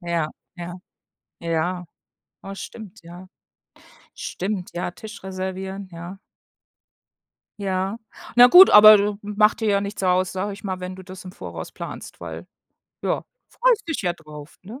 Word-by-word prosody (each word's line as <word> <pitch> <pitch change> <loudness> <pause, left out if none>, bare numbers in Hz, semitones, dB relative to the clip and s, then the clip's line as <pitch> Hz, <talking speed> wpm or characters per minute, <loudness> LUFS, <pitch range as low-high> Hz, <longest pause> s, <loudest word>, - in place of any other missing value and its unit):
Ja, 170 -3 -1 0.3
ja, 175 0 -6 0.7
ja. 170 +2 -2 0.6
Oh, 195 - -7
stimmt, 215 0 -10
ja. 175 +2 -11 0.9
Stimmt, 190 -1 -4
ja, 175 0 -3
Tisch 220 +5 -11
reservieren, 190 +1 -5
ja. 175 +3 -9 1.4
Ja. 195 +2 -2 0.4
Na 245 +1 +9
gut, 365 +8 +10
aber 215 0 +10
d 205 +1 +1
macht 210 +2 +2
dir 220 - 0
ja 200 -1 +3
nichts 200 0 -5
aus, 185 0 +2
sage 190 +2 -3
ich 205 +2 -11
mal, 185 -2 -3
wenn 180 0 -6
du 190 - -10
das 190 +2 -11
im 185 - -8
Voraus - - -8
planst, - - -9
weil, - - -7 0.6
ja, - - -1 0.3
freust 485 -5 +2
dich 320 - -2
ja 175 -2 +1
drauf, 150 -2 -12
ne? 220 +8 -10
190 Hz, 150 wpm, -23 LUFS, 180-210 Hz, 1.4 s, gut